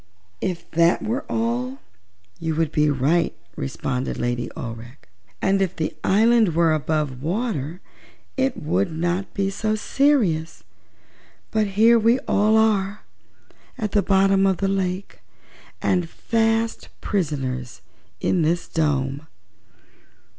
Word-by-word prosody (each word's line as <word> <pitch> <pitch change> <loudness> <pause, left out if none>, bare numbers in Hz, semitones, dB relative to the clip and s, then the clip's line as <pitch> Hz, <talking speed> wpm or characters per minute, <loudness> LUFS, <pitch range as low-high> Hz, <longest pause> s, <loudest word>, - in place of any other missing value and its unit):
"If 180 -2 -3
that 170 +1 +3
were 235 +5 -2
all 245 +3 -1 0.6
you 160 -1 -2
would 160 -2 0
be 150 0 +2
right," 145 +5 +1 0.2
responded 130 -1 -3
Lady 120 0 -2
Aurex; 115 +2 -7 0.5
"and 195 0 +2
if 190 -2 0
the 160 - -3
island 220 -3 +4
were 165 -1 +4
above 150 -4 -1
water 175 - -2 0.5
it 265 -1 0
would 100 - 0
not 175 +4 -2
be 195 0 0
so 215 +2 -1
serious. 210 - +1 0.9
But 215 -1 +1
here 230 +2 +6
we 230 +3 +4
all 215 +2 +3
are, 210 -2 +1 0.7
at 210 -2 -2
the 205 - +3
bottom 195 0 +3
of 190 -2 +1
the 195 - 0
lake, 190 0 -2 0.6
and 180 -3 +1
fast 225 +2 0
prisoners 130 - -3 0.4
in 180 - +1
this 165 +2 0
dome." 145 -2 -1
180 Hz, 120 wpm, -23 LUFS, 155-215 Hz, 0.9 s, here